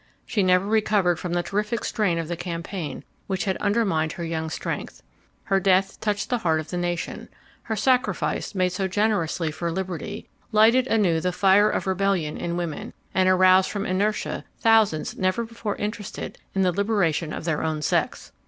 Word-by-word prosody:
She 210 - 0
never 185 0 +3
recovered 205 -5 +2
from 175 -1 -4
the 175 0 +1
terrific 210 +4 -2
strain 195 -6 0
of 165 -1 -3
the 175 - -3
campaign 170 -1 -5 0.2
which 190 +1 -2
had 190 -2 0
undermined 200 -7 +1
her 170 - -6
young 160 -1 -3
strength. 155 - -5 0.4
Her 195 -1 +2
death 195 0 +2
touched 210 +1 -2
the 245 - +1
heart 160 -5 +1
of 155 - -7
the 180 - -2
nation; 175 -1 -3 0.3
her 220 - -3
sacrifice, 250 -1 0
made 185 -1 +2
so 190 +1 -1
generously 185 -5 0
for 170 +2 -3
liberty, 190 +3 -5 0.2
lighted 230 +4 +5
anew 185 -9 +2
the 180 +2 0
fire 195 +3 +4
of - - -1
rebellion 190 -5 0
in 170 0 -3
women, 170 -4 -4 0.2
and 185 0 +3
aroused 185 0 +5
from 205 -1 -3
inertia 205 +3 -1 0.2
thousands 220 -8 +3
never 185 +5 +1
before 225 -2 -4
interested 210 0 -5 0.2
in 195 - +2
the 180 - +3
liberation 175 -5 0
of - - -5
their 160 -3 0
own 155 -1 -2
sex. - - -1
185 Hz, 175 wpm, -24 LUFS, 170-210 Hz, 0.4 s, lighted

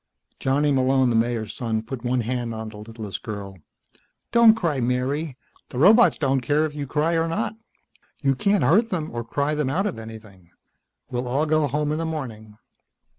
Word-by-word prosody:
Johnny 145 +2 +2
Malone, 130 -1 +3
the - - +1
Mayor's 115 -2 0
son, 110 -2 -2
put 120 +1 -7
one 125 0 +1
hand 120 0 -3
on 110 0 -5
the 105 - -11
littlest 105 -1 -7
girl. 100 -3 -7 0.7
"Don't 235 -2 +7
cry, 165 -10 -1
Mary. 130 +4 -1 0.3
The - - -7
robots 215 - +6
don't 135 -2 +1
care 150 +5 +2
if 155 - -5
you 145 -2 -5
cry 155 +4 0
or 165 0 +1
not. 165 +5 -2 0.7
You 135 -1 +3
can't 200 +9 +1
hurt 220 +9 +4
them 165 -6 -3
or 120 0 -3
cry 140 +5 -1
them 150 -3 0
out 185 +9 0
of 190 - -3
anything. 110 -5 -12 0.6
We'll 125 0 -2
all 140 +5 +1
go 155 -1 +2
home 150 +2 -1
in 155 - -1
the 165 - -1
morning." 110 -9 -6
135 Hz, 185 wpm, -24 LUFS, 115-155 Hz, 0.7 s, Don't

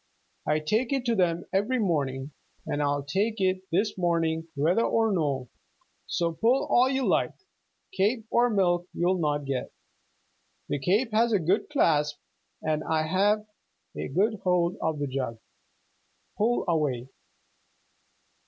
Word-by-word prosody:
I 150 - +3
take 215 - 0
it 270 -2 0
to 235 -2 +2
them 175 -3 +1
every 205 +7 +1
morning 145 - -1 0.3
and 145 - -2
I'll 145 -1 0
take 200 +10 0
it 185 -1 +1
this 195 +3 0
morning 165 -2 0
whether 165 +10 +2
or 225 -1 +2
no, 140 -8 -1 0.6
so 170 -1 0
pull 235 +10 +2
all 250 +2 +4
you 265 -1 0
like - - +1 0.6
cape 225 - +1
or 245 +1 +4
milk 175 -4 +1
you'll 180 +2 +1
not 145 -2 0
get. 135 -2 -3 1.0
The 145 - -1
cape 205 - +1
has 230 +1 +3
a 205 - +4
good 180 +5 0
clasp, 150 - +2 0.5
and 155 -1 0
I've 190 +8 +1 0.5
a - - -4
good 205 - +1
hold 180 -1 +1
of 160 -1 0
the 145 - -2
jug. 130 -4 -3 1.0
Pull 235 +3 +1
away!" 145 -7 0
175 Hz, 140 wpm, -27 LUFS, 150-215 Hz, 1.0 s, all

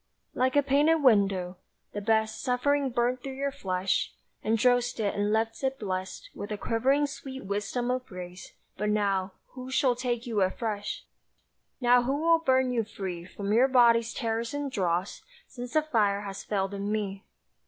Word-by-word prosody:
Like 255 +1 +1
a 285 - +5
painted 295 +3 +3
window: 195 -6 +3 0.4
the 205 - -3
best 220 +1 +1
Suffering 275 +2 +1
burnt 245 +1 0
through 270 0 -6
your 280 +1 -1
flesh, 190 -8 -1 0.3
Undrossed 245 +2 +2
it 205 -2 0
and 205 +1 0
left 225 +3 0
it 265 0 0
blest 190 - -5
With 205 - -7
a 210 - -2
quivering 265 +8 +2
sweet 270 -4 -7
wisdom 210 +5 -2
of 255 0 -2
grace: 180 -1 -9 0.2
but 210 +2 -1
now 200 -2 0 0.2
Who 255 0 -9
shall 260 -1 +2
take 240 -1 -2
you 225 -4 0
afresh? 205 +2 -2 0.7
Now 245 -1 +5
who 260 +3 0
will 330 +2 +4
burn 260 -4 +2
you 235 -2 +1
free 185 -5 -6
From 200 +2 -3
your 245 +4 +5
body's 235 -3 +4
terrors 230 +1 -2
and 290 -1 -3
dross, 180 -3 -1 0.2
Since 245 -1 -8
the 310 - +3
fire 210 -9 +1
has 195 -1 -6
failed 195 -1 -1
in 200 +1 -3
me? 200 -2 -2
230 Hz, 170 wpm, -28 LUFS, 200-260 Hz, 0.7 s, a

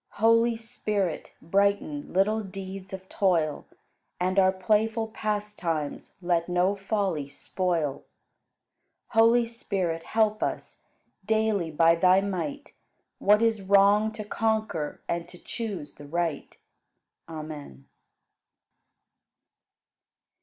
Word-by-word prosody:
Holy 230 +2 +4
Spirit, 210 -6 -3
brighten 195 -5 0
Little 210 +4 +2
deeds 195 -1 -8
of 190 0 -8
toil, 165 -8 0 0.5
And 185 +2 +2
our 190 0 +5
playful 220 +4 +1
pastimes 210 -8 -3
Let 175 -1 +1
no 180 +3 +2
folly 195 -7 -2
spoil. 160 -1 -2 1.1
Holy 230 +1 +5
Spirit, 190 -8 -3
help 215 +2 +1
us - - -4 0.4
Daily 215 -4 +1
by 165 +2 +4
Thy 185 +3 +5
might 275 - -4 0.5
What 210 +2 +4
is 225 -2 +2
wrong 200 +2 +4
to 215 -1 -6
conquer 215 -8 -1
And 170 0 -2
to 175 - -13
choose 195 - -6
the 145 - -12
right. 165 -1 -3 0.7
Amen. 150 - -8
195 Hz, 100 wpm, -27 LUFS, 170-215 Hz, 1.1 s, our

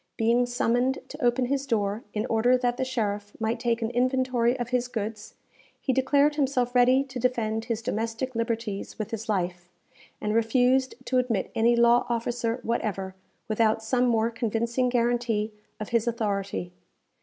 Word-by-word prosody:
Being 235 +2 +3
summoned 245 +2 +1
to 295 -1 -8
open 245 +1 +2
his 275 +2 -1
door, 210 -2 0
in 210 +1 -2
order 245 +2 +3
that 245 -1 0
the - - 0
sheriff 210 -5 -2
might 225 +1 -1
take 235 -1 0
an 225 - -1
inventory 255 0 +1
of 240 -1 -4
his 250 -1 0
goods, 215 -3 -5 0.4
he 265 - 0
declared 285 +3 +3
himself 255 -4 +1
ready 255 +2 +5
to 265 -2 -7
defend 225 -3 0
his 230 -1 -3
domestic 230 +2 -2
liberties 230 -3 -3
with 215 -1 -4
his 225 0 -5
life, 175 -3 -2 0.5
and 210 - -1
refused 250 +3 +2
to 255 - +2
admit 235 -6 -1
any 235 +1 +3
law 235 +1 +4
officer 235 0 -1
whatever, 200 -5 -2 0.3
without 220 0 +1
some 250 +2 +2
more 230 -1 +2
convincing 235 +2 0
guarantee 235 -3 0 0.3
of 215 - -5
his 235 0 +1
authority. 200 -5 -2
235 Hz, 160 wpm, -26 LUFS, 220-250 Hz, 0.5 s, ready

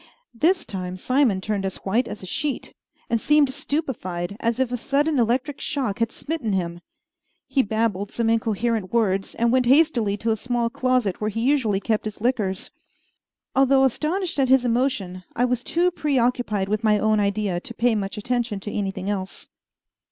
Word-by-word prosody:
This 335 +10 +2
time 185 -2 -5
Simon 255 -2 +2
turned 205 -1 -2
as 190 -1 -3
white 230 +6 +1
as 210 - -7
a - - -5
sheet, 275 +9 -3 0.3
and 230 -2 0
seemed 295 -2 +3
stupefied, 250 - -3
as 230 +1 0
if 260 -2 +1
a - - 0
sudden 285 +3 +1
electric 250 +5 0
shock 255 -9 -2
had 230 0 +1
smitten 290 -10 -3
him. 175 -2 -2 0.7
He 275 - +2
babbled 210 -3 -1
some 230 -1 -1
incoherent 225 -2 0
words, 195 -5 0
and 235 0 +2
went 255 -1 +3
hastily 250 -8 +3
to 225 +2 -1
a - - +2
small 240 +1 -1
closet 255 -7 0
where 215 - 0
he 225 +1 -3
usually 240 -6 +2
kept 215 +1 -1
his 215 -1 -5
liquors. 210 -5 -1 0.8
Although 270 0 +5
astonished 315 - 0
at 265 -2 +2
his 260 -1 +5
emotion, 230 -7 0
I 245 - +2
was 250 -1 -1
too 350 +5 +1
preoccupied 245 - 0
with 215 +3 -1
my 215 -1 +4
own 215 0 +2
idea 200 -3 0
to 235 - -8
pay 235 0 +2
much 200 -2 -3
attention 235 -1 -1
to 205 - -5
anything 195 -2 -3
else. 195 -2 -4
230 Hz, 175 wpm, -23 LUFS, 205-260 Hz, 0.8 s, Although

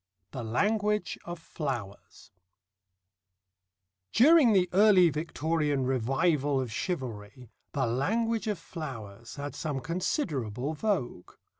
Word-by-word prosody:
THE 130 - -5
LANGUAGE 210 - 0
OF 175 0 -5
FLOWERS 120 - -6 1.8
During 285 0 +6
the 185 -3 +4
early 190 -4 +6
Victorian 150 -2 -1
revival 135 +3 +1
of 125 -4 -3
chivalry 120 - -5 0.2
the 135 -3 +1
Language 220 - 0
of 210 -2 -1
Flowers 115 - -8
had 140 -1 -5
some 145 -4 -3
considerable 145 - -2
vogue. 155 - -2
150 Hz, 100 wpm, -29 LUFS, 125-185 Hz, 1.8 s, During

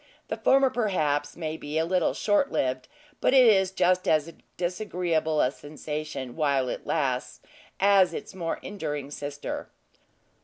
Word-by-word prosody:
The - - -2
former 270 -1 +4
perhaps, 155 - 0
may 160 -2 -4
be 150 +1 -4
a 160 - +2
little 180 0 +1
short 220 +7 +2
lived; 130 -1 -1 0.3
but 265 - +3
it 260 -2 +8
is 190 -4 +5
just 185 -1 +1
as 155 +1 +2 0.2
disagreeable 175 -4 0
a 125 - +2
sensation 150 -3 -6
while 140 -5 +1
it - - -6
lasts 130 -5 -1 0.4
as 195 -2 +5
its - - -7
more 170 -3 -3
enduring 150 -8 -5
sister. 145 0 -5
160 Hz, 145 wpm, -27 LUFS, 145-190 Hz, 0.4 s, it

